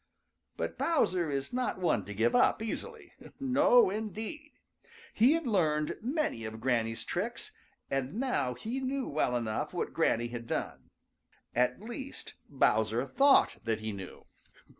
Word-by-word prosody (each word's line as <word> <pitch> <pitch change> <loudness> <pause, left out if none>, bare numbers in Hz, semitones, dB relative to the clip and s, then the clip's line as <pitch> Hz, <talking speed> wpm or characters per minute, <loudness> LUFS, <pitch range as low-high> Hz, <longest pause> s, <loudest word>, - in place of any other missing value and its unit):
But - - -4
Bowser 185 - +2
is 140 - -3
not 250 0 -1
one 175 - +1
to 105 - -7
give 115 +3 +2
up - - +4
easily. 460 - -6 0.3
No, 260 -5 +5
indeed! 220 - -5 0.6
He 245 +7 +5
had 330 -1 -1
learned 155 -9 +1
many 260 - -1
of 110 0 -6
Granny's 115 -2 0
tricks, 235 - -3 0.4
and 135 +3 -1
now 145 - 0
he 235 - -4
knew 265 0 -2
well 140 -4 0
enough 110 -2 -3
what - - -2
Granny 120 +1 +1
had 115 -1 -7
done. - - -4 0.6
At 125 - +1
least, 260 +4 -7 0.2
Bowser - - +2
thought 275 0 +4
that 115 -1 -1
he 110 0 -3
knew. 95 -2 -9
185 Hz, 140 wpm, -31 LUFS, -, 0.6 s, No